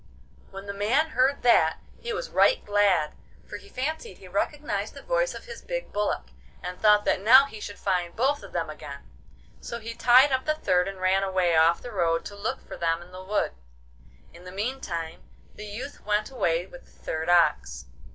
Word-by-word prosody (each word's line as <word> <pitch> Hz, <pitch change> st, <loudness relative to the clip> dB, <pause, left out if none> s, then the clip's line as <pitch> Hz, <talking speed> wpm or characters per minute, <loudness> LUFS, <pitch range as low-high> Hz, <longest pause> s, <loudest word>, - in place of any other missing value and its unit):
When 195 Hz, +1 st, -9 dB
the 200 Hz, -, -5 dB
man 250 Hz, +11 st, +1 dB
heard 265 Hz, +2 st, +2 dB
that 160 Hz, -10 st, +4 dB, 0.2 s
he 475 Hz, -, -5 dB
was 480 Hz, +3 st, -4 dB
right -, -, +3 dB
glad, 200 Hz, -7 st, +2 dB, 0.3 s
for -, -, -7 dB
he 405 Hz, -, -16 dB
fancied 285 Hz, -, -4 dB
he 190 Hz, -, -14 dB
recognised 290 Hz, -, -2 dB
the -, -, -10 dB
voice -, -, 0 dB
of -, -, -9 dB
his 475 Hz, -1 st, -9 dB
big -, -, -5 dB
bullock, 210 Hz, 0 st, -1 dB, 0.3 s
and 180 Hz, 0 st, -6 dB
thought 210 Hz, -1 st, +5 dB
that -, -, +1 dB
now 255 Hz, +6 st, +8 dB
he 220 Hz, -6 st, -10 dB
should 205 Hz, -1 st, -7 dB
find 180 Hz, -3 st, -1 dB
both 275 Hz, +5 st, +1 dB
of -, -, -11 dB
them -, -, -2 dB
again. -, -, -9 dB, 0.5 s
So 235 Hz, -, -6 dB
he 230 Hz, 0 st, -6 dB
tied 255 Hz, +4 st, +6 dB
up 260 Hz, 0 st, 0 dB
the 310 Hz, -, +1 dB
third, 180 Hz, -10 st, +1 dB
and 195 Hz, -1 st, -6 dB
ran 185 Hz, +1 st, +2 dB
away 185 Hz, -3 st, +1 dB
off 165 Hz, +1 st, +4 dB
the 245 Hz, -, -7 dB
road 165 Hz, -5 st, 0 dB
to 205 Hz, -, -7 dB
look 200 Hz, +2 st, -4 dB
for -, -, -8 dB
them 165 Hz, 0 st, 0 dB
in 175 Hz, -, -18 dB
the 185 Hz, 0 st, -9 dB
wood. 205 Hz, +2 st, 0 dB, 0.8 s
In 170 Hz, -, -14 dB
the 180 Hz, -, -9 dB
meantime 190 Hz, -7 st, -4 dB, 0.3 s
the 210 Hz, -, -9 dB
youth 245 Hz, +8 st, -8 dB
went 210 Hz, +3 st, 0 dB
away 175 Hz, -9 st, 0 dB
with 265 Hz, +7 st, -14 dB
the -, -, -25 dB
third 160 Hz, +2 st, -2 dB
ox. 65 Hz, -, +2 dB
205 Hz, 200 wpm, -26 LUFS, 180-260 Hz, 0.8 s, now